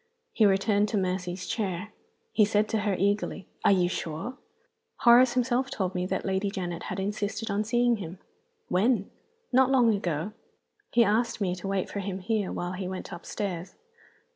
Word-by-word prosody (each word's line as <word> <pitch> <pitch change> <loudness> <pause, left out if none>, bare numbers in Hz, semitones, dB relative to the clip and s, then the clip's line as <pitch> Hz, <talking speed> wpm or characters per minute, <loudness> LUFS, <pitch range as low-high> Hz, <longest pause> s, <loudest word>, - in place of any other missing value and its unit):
He 215 - +5
returned 200 +1 +2
to 215 - 0
Mercy's 185 -1 -2
chair; 200 -2 -2 0.4
he 215 - +4
said 210 +1 +2
to 220 - +1
her, 205 -2 0
eagerly, 200 0 0 0.2
"Are - - +5
you 180 -2 +4
sure?" 170 +7 -4 0.7
"Horace 240 +1 +7
himself 255 +1 +1
told 190 -3 -2
me 180 0 -1
that - - -2
Lady 190 +1 0
Janet 175 -4 -4
had 190 - -3
insisted 205 +2 -2
on 205 +1 +1
seeing 240 +1 +2
him." 180 -2 -7 0.5
"When?" 200 +2 +1 0.4
"Not 260 +1 +5
long 245 -4 +5
ago. 180 0 -2 0.6
He 235 - +5
asked 225 +3 +1
me 190 -4 0
to 185 +1 -6
wait 195 -1 0
for 200 - -5
him 195 -1 -3
here 205 0 -1
while 175 0 -3
he 185 0 -4
went 185 +1 -6
upstairs." 180 0 -5
200 Hz, 170 wpm, -28 LUFS, 185-220 Hz, 0.7 s, Horace